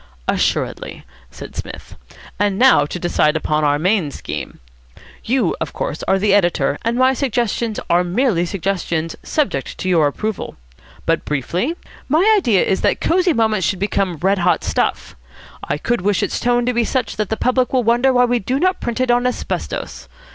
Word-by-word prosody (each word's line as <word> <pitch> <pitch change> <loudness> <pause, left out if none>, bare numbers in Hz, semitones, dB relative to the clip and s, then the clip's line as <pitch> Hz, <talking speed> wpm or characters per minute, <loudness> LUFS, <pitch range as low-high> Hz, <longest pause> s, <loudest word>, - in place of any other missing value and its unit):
"Assuredly," - - -1 0.2
said - - -11
Psmith. - - -8 0.4
"And 205 -1 +1
now 255 - +5
to 180 - -5
decide 165 -3 +1
upon 155 -1 0
our 145 0 +3
main 180 0 +1
scheme. - - -7 0.6
You, 255 +3 +1
of - - -3
course, - - -4
are 190 - +3
the 200 +1 +2
editor, 175 -8 +2
and 230 +1 0
my 260 +1 +4
suggestions 235 -4 -1
are 175 +1 +3
merely 180 -1 +1
suggestions, 170 -3 -2
subject 185 - -2
to - - -4
your 165 -5 +4
approval. 215 +8 -4 0.5
But, - - +1
briefly, 170 - -2 0.3
my 355 +10 +4
idea 240 - +3
is 190 - 0
that - - +1
Cosy 360 0 +2
Moments 220 - +1
should 190 - -1
become 195 -2 -1
red 190 +5 +1
hot 180 0 +2
stuff. - - -1 0.5
I 145 - -2
could 240 +8 -1
wish 200 +1 +1
its - - -2
tone 245 0 +1
to 250 - 0
be 235 0 +2
such 240 -2 -2
that 215 -2 -1
the 220 - -1
public 255 0 +1
will 255 -2 +2
wonder 240 +4 +3
why 250 -1 +4
we 245 0 +1
do 255 +7 -1
not 370 +3 +1
print 235 0 -3
it 255 -1 +2
on 245 +1 +2
asbestos. 250 - -4
215 Hz, 180 wpm, -19 LUFS, 180-250 Hz, 0.6 s, now